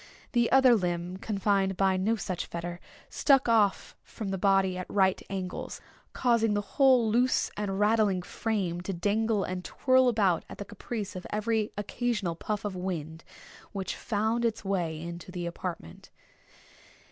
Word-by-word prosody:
The 240 Hz, -2 st, +2 dB
other 265 Hz, -2 st, +7 dB
limb, 180 Hz, -3 st, -1 dB
confined 195 Hz, -2 st, 0 dB
by 190 Hz, 0 st, +3 dB
no 200 Hz, +5 st, +1 dB
such 185 Hz, -5 st, -4 dB
fetter, 175 Hz, +1 st, -5 dB, 0.3 s
stuck 270 Hz, -3 st, +3 dB
off 215 Hz, -4 st, +2 dB
from 215 Hz, -3 st, -7 dB
the 195 Hz, -, -2 dB
body 195 Hz, -1 st, +3 dB
at 185 Hz, 0 st, -6 dB
right 190 Hz, -2 st, +2 dB
angles, 190 Hz, -2 st, -5 dB, 0.3 s
causing 230 Hz, -4 st, +2 dB
the 205 Hz, -, +1 dB, 0.2 s
whole 260 Hz, -4 st, +6 dB
loose 250 Hz, +3 st, +2 dB
and 200 Hz, -2 st, -2 dB
rattling 210 Hz, -3 st, +3 dB
frame 185 Hz, -5 st, -2 dB
to 195 Hz, +2 st, -4 dB
dangle 205 Hz, +3 st, +1 dB
and 185 Hz, 0 st, -4 dB
twirl 260 Hz, +4 st, +3 dB
about 200 Hz, -7 st, +2 dB
at -, -, -9 dB
the 205 Hz, -, -6 dB
caprice 205 Hz, 0 st, -6 dB
of 180 Hz, -, -6 dB
every 215 Hz, 0 st, 0 dB
occasional 210 Hz, -3 st, -1 dB
puff 210 Hz, +4 st, -4 dB
of 200 Hz, -2 st, -3 dB
wind 165 Hz, -3 st, -4 dB, 0.5 s
which 195 Hz, -2 st, -3 dB
found 220 Hz, +2 st, -1 dB
its 225 Hz, -3 st, -1 dB
way 175 Hz, -5 st, -1 dB
into 170 Hz, +2 st, -7 dB
the 180 Hz, -1 st, -4 dB
apartment. 170 Hz, -, -6 dB
200 Hz, 155 wpm, -29 LUFS, 180-225 Hz, 0.5 s, other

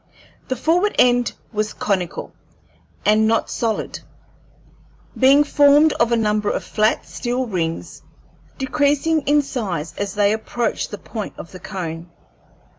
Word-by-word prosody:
The 260 Hz, -, -1 dB
forward 350 Hz, -, +1 dB
end 245 Hz, -1 st, +4 dB, 0.2 s
was 215 Hz, 0 st, -1 dB
conical 185 Hz, -4 st, -2 dB, 0.7 s
and 215 Hz, +1 st, +4 dB
not 225 Hz, 0 st, +1 dB
solid, 225 Hz, -2 st, -2 dB, 1.2 s
being 275 Hz, +3 st, +5 dB
formed 290 Hz, +1 st, +5 dB
of 235 Hz, 0 st, +1 dB
a 235 Hz, -, +3 dB
number 210 Hz, -1 st, +1 dB
of -, -, -2 dB
flat 215 Hz, 0 st, +1 dB
steel 250 Hz, +1 st, -3 dB
rings, 165 Hz, -, -3 dB, 0.6 s
decreasing 290 Hz, +3 st, +1 dB
in 295 Hz, 0 st, +4 dB
size 180 Hz, -, -4 dB
as 200 Hz, 0 st, -3 dB
they 205 Hz, 0 st, +3 dB
approached 225 Hz, +2 st, -2 dB
the 205 Hz, -, -6 dB
point 215 Hz, +1 st, -7 dB
of 170 Hz, -, -9 dB
the 185 Hz, -, -10 dB
cone. 175 Hz, -4 st, -6 dB
225 Hz, 130 wpm, -21 LUFS, 200-270 Hz, 1.2 s, being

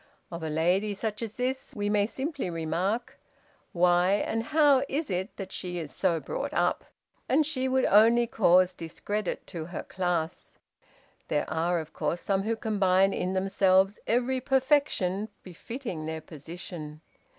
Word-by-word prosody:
Of 170 Hz, 0 st, -6 dB
a 160 Hz, -, -3 dB
lady 180 Hz, +7 st, +1 dB
such 215 Hz, +1 st, -3 dB
as 225 Hz, -2 st, -5 dB
this 255 Hz, +2 st, -2 dB
we 205 Hz, -1 st, -2 dB
may 205 Hz, 0 st, +2 dB
simply 275 Hz, -, -3 dB
remark, 175 Hz, +8 st, -2 dB, 0.5 s
'Why, 175 Hz, +1 st, +3 dB
and 225 Hz, +2 st, 0 dB
how, 290 Hz, -2 st, +4 dB
is 290 Hz, -4 st, -2 dB
it 185 Hz, +4 st, -3 dB
that 190 Hz, -2 st, -6 dB
she 180 Hz, -1 st, -4 dB
is 160 Hz, -4 st, -5 dB
so 165 Hz, -2 st, +1 dB
brought -, -, -4 dB
up?' -, -, +1 dB, 0.4 s
and 300 Hz, +4 st, +4 dB
she 260 Hz, -4 st, -1 dB
would 260 Hz, 0 st, +2 dB
only 230 Hz, +4 st, +6 dB
cause 185 Hz, -5 st, +4 dB
discredit 185 Hz, +4 st, -4 dB
to 165 Hz, -3 st, -6 dB
her 175 Hz, -, -6 dB
class. 175 Hz, -3 st, -3 dB, 0.7 s
There 150 Hz, -, 0 dB
are, 165 Hz, +2 st, 0 dB
of 160 Hz, -1 st, -6 dB
course, 170 Hz, -, -2 dB
some 195 Hz, -1 st, 0 dB
who 225 Hz, +3 st, -1 dB
combine 195 Hz, -3 st, +2 dB
in 185 Hz, +1 st, -2 dB
themselves 190 Hz, +1 st, +3 dB
every 250 Hz, +2 st, +1 dB
perfection 260 Hz, -8 st, +1 dB
befitting 185 Hz, -, -6 dB
their 160 Hz, 0 st, -4 dB
position. 155 Hz, 0 st, -8 dB
195 Hz, 150 wpm, -28 LUFS, 175-230 Hz, 0.7 s, only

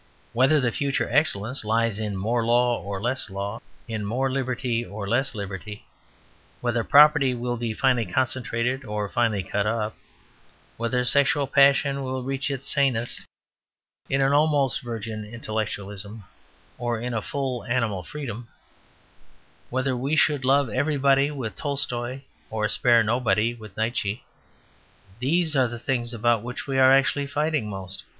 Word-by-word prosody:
Whether 135 Hz, +6 st, +4 dB
the 125 Hz, -3 st, +1 dB
future 140 Hz, +3 st, -1 dB
excellence 130 Hz, -5 st, +1 dB
lies 110 Hz, 0 st, +1 dB
in 105 Hz, -3 st, -3 dB
more 115 Hz, +5 st, 0 dB
law 120 Hz, +1 st, +2 dB
or 100 Hz, -1 st, -5 dB
less 120 Hz, +3 st, -2 dB
law, 100 Hz, +3 st, -5 dB, 0.3 s
in 110 Hz, -2 st, -3 dB
more 130 Hz, +6 st, -1 dB
liberty 125 Hz, -3 st, -1 dB
or 100 Hz, -1 st, -6 dB
less 135 Hz, +5 st, 0 dB
liberty; 100 Hz, +1 st, -6 dB, 0.7 s
whether 120 Hz, -1 st, 0 dB
property 145 Hz, -2 st, +6 dB
will 120 Hz, 0 st, -2 dB
be 115 Hz, -2 st, -3 dB
finally 125 Hz, -4 st, +2 dB
concentrated 130 Hz, +1 st, -1 dB
or 105 Hz, -3 st, -3 dB
finally 110 Hz, -3 st, 0 dB
cut 100 Hz, +2 st, -1 dB
up; 110 Hz, -1 st, -1 dB, 0.8 s
whether 125 Hz, +2 st, -1 dB
sexual 140 Hz, +2 st, +3 dB
passion 140 Hz, 0 st, +4 dB
will 130 Hz, -1 st, -3 dB
reach 135 Hz, +1 st, -2 dB
its 140 Hz, -1 st, -4 dB
sanest 130 Hz, -5 st, 0 dB, 0.8 s
in 135 Hz, 0 st, +1 dB
an 135 Hz, +1 st, +3 dB
almost 145 Hz, -3 st, +3 dB
virgin 115 Hz, -3 st, -5 dB
intellectualism 105 Hz, -1 st, -5 dB, 0.6 s
or 120 Hz, -1 st, -1 dB
in 125 Hz, +1 st, -3 dB
a 110 Hz, -, -1 dB
full 130 Hz, 0 st, -3 dB
animal 115 Hz, -6 st, 0 dB
freedom; 120 Hz, -, -7 dB, 1.2 s
whether 130 Hz, +1 st, 0 dB
we 135 Hz, +5 st, -1 dB
should 150 Hz, -3 st, +3 dB
love 140 Hz, +1 st, +3 dB
everybody 140 Hz, +1 st, +2 dB
with 130 Hz, -9 st, -5 dB
Tolstoy, 130 Hz, -3 st, -3 dB, 0.3 s
or 110 Hz, -1 st, -1 dB
spare 120 Hz, +1 st, +4 dB
nobody 115 Hz, 0 st, +1 dB
with 110 Hz, -4 st, -13 dB
Nietzsche; 110 Hz, -1 st, -1 dB, 1.0 s
these 160 Hz, +4 st, +1 dB
are 130 Hz, -2 st, +4 dB
the 120 Hz, 0 st, -6 dB
things 120 Hz, 0 st, -1 dB
about 120 Hz, -1 st, +1 dB
which 120 Hz, +2 st, -6 dB
we 135 Hz, -1 st, 0 dB
are 130 Hz, 0 st, +7 dB
actually 135 Hz, +1 st, +3 dB
fighting 150 Hz, -5 st, -1 dB
most. 95 Hz, -1 st, -6 dB
120 Hz, 145 wpm, -25 LUFS, 110-135 Hz, 1.2 s, are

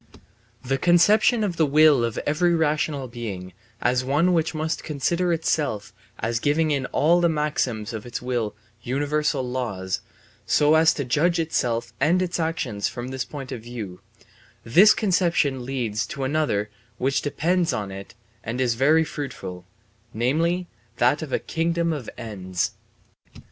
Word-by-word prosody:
The 135 Hz, +1 st, 0 dB
conception 205 Hz, -, +4 dB
of 180 Hz, -5 st, -2 dB
the 160 Hz, -, +4 dB
will 150 Hz, -3 st, +5 dB
of 115 Hz, -2 st, -2 dB
every 170 Hz, +4 st, +2 dB
rational 150 Hz, -3 st, 0 dB
being 100 Hz, -7 st, -6 dB, 0.3 s
as 125 Hz, +1 st, +2 dB
one 150 Hz, +7 st, +2 dB
which 165 Hz, -1 st, 0 dB
must 155 Hz, +1 st, -2 dB
consider 170 Hz, +4 st, 0 dB
itself 150 Hz, -9 st, -1 dB, 0.2 s
as 115 Hz, +1 st, -1 dB
giving 155 Hz, +4 st, +1 dB
in 135 Hz, -3 st, 0 dB
all 170 Hz, +4 st, +3 dB
the 170 Hz, -, +4 dB
maxims 130 Hz, -8 st, -1 dB
of 110 Hz, -2 st, -5 dB
its 120 Hz, -, -5 dB
will 120 Hz, -4 st, -2 dB, 0.3 s
universal 145 Hz, +2 st, 0 dB
laws, 110 Hz, -8 st, -3 dB, 0.5 s
so 150 Hz, +1 st, +4 dB
as 160 Hz, 0 st, +6 dB
to 140 Hz, -, -3 dB
judge 155 Hz, +8 st, +2 dB
itself 120 Hz, -7 st, -1 dB
and 175 Hz, +4 st, +3 dB
its 180 Hz, -1 st, -1 dB
actions 140 Hz, -11 st, -1 dB
from 120 Hz, +1 st, -6 dB
this 130 Hz, 0 st, -3 dB
point 140 Hz, -3 st, -8 dB
of 115 Hz, -, -5 dB
view 110 Hz, -6 st, -7 dB, 0.6 s
this 190 Hz, -, +6 dB
conception 170 Hz, -, +1 dB
leads 120 Hz, -5 st, -2 dB
to 140 Hz, -, -5 dB
another 130 Hz, -8 st, 0 dB, 0.3 s
which 135 Hz, +1 st, 0 dB
depends 170 Hz, +4 st, 0 dB
on 100 Hz, -2 st, -3 dB
it 95 Hz, 0 st, -9 dB, 0.3 s
and 115 Hz, +3 st, -4 dB
is 125 Hz, -2 st, +2 dB
very 150 Hz, +7 st, +4 dB
fruitful, 95 Hz, -, -7 dB, 0.5 s
namely 165 Hz, +10 st, +1 dB, 0.3 s
that 125 Hz, +6 st, +3 dB
of 155 Hz, -4 st, -6 dB
a -, -, +2 dB
kingdom 170 Hz, 0 st, -1 dB
of 140 Hz, -7 st, -5 dB
ends. 95 Hz, -6 st, -3 dB
140 Hz, 150 wpm, -24 LUFS, 120-160 Hz, 0.6 s, as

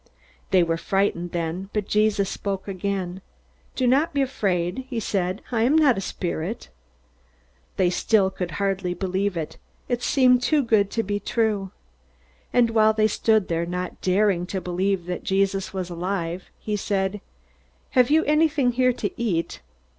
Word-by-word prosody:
They 185 Hz, -2 st, +4 dB
were 165 Hz, -1 st, 0 dB
frightened 175 Hz, -1 st, 0 dB
then, 175 Hz, +3 st, -3 dB
but 210 Hz, -2 st, -1 dB
Jesus 210 Hz, -2 st, +2 dB
spoke 195 Hz, 0 st, -4 dB
again. 190 Hz, -1 st, -3 dB, 0.5 s
"Do 255 Hz, -, 0 dB
not 285 Hz, +6 st, +2 dB
be 280 Hz, -, +3 dB
afraid," 200 Hz, -3 st, -1 dB
he 240 Hz, -4 st, -2 dB
said. 190 Hz, -2 st, -2 dB
"I 230 Hz, -2 st, +1 dB
am 255 Hz, +7 st, +3 dB
not 295 Hz, -6 st, +5 dB
a 195 Hz, -, -3 dB
spirit." 180 Hz, +2 st, -4 dB, 1.1 s
They 180 Hz, -2 st, +3 dB
still 195 Hz, 0 st, +2 dB
could 180 Hz, -2 st, -4 dB
hardly 195 Hz, -2 st, -1 dB
believe 190 Hz, 0 st, -1 dB
it. 160 Hz, -2 st, -5 dB, 0.3 s
It 245 Hz, -1 st, -1 dB
seemed 250 Hz, -1 st, +4 dB
too 295 Hz, +2 st, +2 dB
good 215 Hz, -4 st, +3 dB
to 225 Hz, +2 st, -1 dB
be 205 Hz, 0 st, -2 dB
true. 210 Hz, -2 st, 0 dB, 0.8 s
And 240 Hz, -2 st, +3 dB
while 220 Hz, -1 st, +4 dB
they 215 Hz, 0 st, +2 dB
stood 220 Hz, -1 st, +2 dB
there, 170 Hz, 0 st, -1 dB
not 180 Hz, 0 st, -4 dB
daring 185 Hz, -1 st, +2 dB
to 190 Hz, -, -3 dB
believe 185 Hz, 0 st, -1 dB
that 180 Hz, 0 st, -4 dB
Jesus 195 Hz, 0 st, 0 dB
was 185 Hz, -2 st, -4 dB
alive, 175 Hz, 0 st, -3 dB
he 210 Hz, -, -3 dB
said, 195 Hz, 0 st, -1 dB, 0.7 s
"Have 250 Hz, 0 st, +4 dB
you 315 Hz, +2 st, +4 dB
anything 300 Hz, -4 st, +2 dB
here 250 Hz, +1 st, +2 dB
to -, -, -3 dB
eat?" 170 Hz, -, -1 dB
200 Hz, 160 wpm, -24 LUFS, 180-230 Hz, 1.1 s, not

